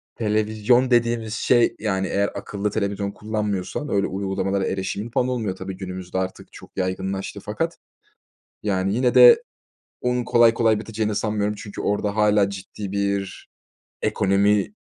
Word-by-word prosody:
televizyon 110 +3 +2
dediğimiz 115 -2 +2
şey, 120 +1 +3
yani, 95 -3 -1
eğer 100 +1 +1
akıllı 100 +1 -3
televizyon 100 -1 -2
kullanmıyorsan 105 +5 -3
öyle 100 -3 +1
uygulamalara 95 0 -1
erişimin, 100 +3 -3
falan, 125 +2 +1
olmuyor, 110 -7 -2
tabii, 95 0 -7
günümüzde 95 -1 -6
artık 95 0 -4
çok - - -14
yaygınlaştı 95 +1 -3
fakat, - - -3 0.9
yani, 95 -1 0
yine 125 +1 +2
de 475 -1 +8 0.6
onun 125 0 0
kolay 115 -1 +5
kolay 115 -2 +3
biteceğini 110 -1 -2
sanmıyorum. 105 0 -1
Çünkü 100 0 -8
orada 105 0 -1
hâlâ 105 -2 +3
ciddi 100 0 -7
bir 100 -1 -2 0.5
ekonomi 100 - +2
105 Hz, 135 wpm, -23 LUFS, 95-110 Hz, 0.9 s, de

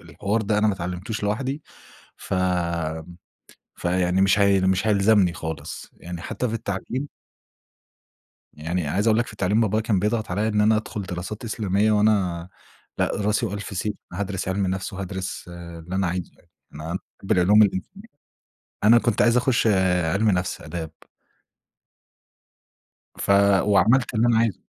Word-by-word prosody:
الحوار 105 +3 -2
ده 105 0 +1
أنا 105 - +3
ما 105 - +1
اتعلمتوش 90 +5 -5
لوحدي، 130 +8 -2 0.5
ف - - -9
آمم 85 -2 -1 0.6
فيعني 90 +1 +1
مش 95 +1 +4
هي 100 -1 +4
مش 95 +2 +1
هيلزمني 100 -3 +4
خالص. 80 -2 -6
يعني 85 0 -8
حتّى 125 - -3
في 115 - -3
التعليم 115 +6 -4 1.5
يعني 80 +2 -3
عايز 100 +9 0
أقول 110 0 +4
لك 120 - 0
في - - -10
التعليم، 105 +2 +1
بابايا 110 0 +1
كان 105 -4 +1
بيضغط 105 0 -1
عليّا 105 +4 0
إن 105 -1 +1
أنا 110 +1 +4
أدخُل 110 0 -4
دراسات 95 +4 -6
إسلامية 105 -1 +1
وأنا 95 -5 +1 0.5
لأ، - - +1
راسي 105 +3 0
وألف 100 -1 -5
سيف، 105 +2 -1 0.2
هادْرِس 95 0 -3
عِلم 95 +1 0
نَفْس 95 +1 -3
وهادْرِس 95 0 -5
اللي 85 0 -8
أنا 95 -1 +1
عايزه 90 0 -3
يعني. 85 - -28 0.2
أنا 75 +2 -7 0.3
باحِب 95 - -4
العلوم 95 +4 +5
الإنسانية. 105 - -1 0.8
أنا 115 +3 +7
كنت 120 -2 +1
عايز 120 0 +4
أخُش 125 -1 +2 0.4
عِلم 100 +7 +2
نَفْس، 90 -1 -1
آداب. 80 0 -6 2.3
ف - - -4 0.3
وعملت 110 +6 +3
اللي 115 +2 +2
أنا 115 - +3
عايزه. 115 -2 +1
100 Hz, 150 wpm, -24 LUFS, 90-110 Hz, 2.3 s, أنا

